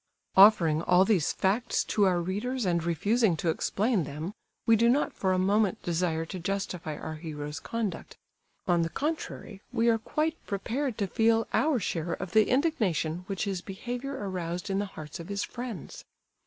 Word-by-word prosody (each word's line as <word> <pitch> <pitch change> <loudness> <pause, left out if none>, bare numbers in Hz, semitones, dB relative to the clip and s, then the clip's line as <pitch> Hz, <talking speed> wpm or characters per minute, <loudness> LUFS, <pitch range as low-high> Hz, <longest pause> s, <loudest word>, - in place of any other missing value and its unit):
Offering 175 -6 +7
all 180 +2 +4
these 190 -7 +2
facts 215 +6 +1
to 205 - +2
our 180 -2 +3
readers 210 +8 -2
and 170 -2 +1
refusing 190 +3 +2
to 165 - 0
explain 205 +3 0
them, 155 +6 -5 0.3
we 225 - +6
do 230 +2 +4
not 280 +5 +2
for 190 - 0
a 185 - +2
moment 205 +3 +2
desire 165 -1 0
to 185 +3 -6
justify 180 -4 -3
our 155 0 -6
hero's 150 -2 -6
conduct. 230 -4 -4 0.5
On 175 -2 +3
the 165 - 0
contrary, 290 - -4
we 235 -1 +2
are 225 -1 +3
quite 315 +7 -2
prepared 235 +5 -2
to 200 - 0
feel 225 +3 +2
our 300 -5 +3
share 170 -3 -2
of 175 - -5
the 215 +2 +4
indignation 200 - +1
which 195 -2 -2
his 195 -4 -2
behaviour 245 +8 -5
aroused 180 0 -3
in 195 - +1
the 205 - -1
hearts 155 -5 -9
of 170 +3 -8
his 200 0 -1
friends. 240 - -7
195 Hz, 175 wpm, -28 LUFS, 170-230 Hz, 0.5 s, Offering